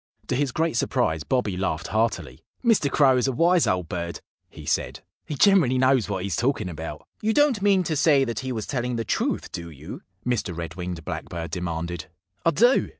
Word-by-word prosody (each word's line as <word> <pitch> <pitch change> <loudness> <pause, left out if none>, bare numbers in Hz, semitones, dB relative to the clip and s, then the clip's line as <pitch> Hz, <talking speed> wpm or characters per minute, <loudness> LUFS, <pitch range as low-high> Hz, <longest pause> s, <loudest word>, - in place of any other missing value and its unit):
To - - +1
his 140 0 0
great 160 0 0
surprise 80 -8 0
Bobby 110 - 0
laughed 90 -4 -2
heartily. 110 - -1 0.2
"Mr. 220 -11 +4
Crow 135 -3 +4
is 125 - +1
a - - +1
wise 170 +6 +3
old 90 -2 0
bird," 85 0 -4 0.3
he - - -12
said, - - -1 0.3
"He 150 - -3
generally 170 -8 +4
knows 130 -4 +3
what 95 -2 -2
he's 95 -4 -2
talking 120 - 0
about." 80 -2 -7
"You 220 +1 +1
don't 290 -8 +3
mean 195 -2 +4
to 160 -2 -1
say 145 -2 +4
that 115 -2 -3
he 130 -1 -4
was 110 -4 -3
telling 125 -2 -2
the 115 -1 -2
truth, - - -1
do 85 0 -6
you?" 75 +2 -9 0.2
Mr. 110 -8 -1
Red 85 -1 -5
winged 90 -3 -6
Blackbird 85 -2 -5
demanded. 85 -2 -3 0.4
"I - - +4
do!" 240 - +4
120 Hz, 200 wpm, -25 LUFS, 85-145 Hz, 0.4 s, Mr